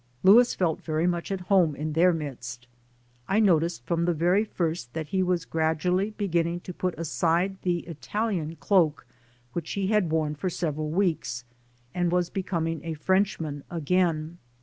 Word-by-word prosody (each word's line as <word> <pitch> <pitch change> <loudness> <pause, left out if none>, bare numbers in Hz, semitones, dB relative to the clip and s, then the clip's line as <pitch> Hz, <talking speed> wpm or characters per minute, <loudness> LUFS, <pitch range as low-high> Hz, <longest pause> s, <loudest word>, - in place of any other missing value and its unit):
Louis 235 +6 +7
felt 170 -4 0
very 160 +1 -1
much 175 +1 -1
at 190 -1 -2
home 180 -5 +3
in 155 +1 -3
their 175 +3 +5
midst. 125 -6 -6 0.6
I 200 - +2
noticed 170 - +2
from 170 0 0
the 175 -1 +1
very 175 +6 +3
first 165 - -3
that 155 -2 -4
he 190 +2 +1
was 180 -2 0
gradually 165 +5 0
beginning 175 -5 -1
to 180 - -7
put 180 -1 -2
aside 170 +4 0
the 175 -2 0
Italian 175 0 -3
cloak 160 -1 +2 0.5
which 170 -2 -4
he 195 -1 -1
had 210 -6 +2
worn 155 -1 0
for 150 +5 -2
sev 170 -3 -2
eral 155 +1 -3
weeks 160 -9 -1 0.5
and 175 -1 0
was 180 -1 +1
becoming 165 -4 -2
a 165 -1 -4
Frenchman 160 -4 0
again. 170 0 0
170 Hz, 165 wpm, -27 LUFS, 155-185 Hz, 0.6 s, Louis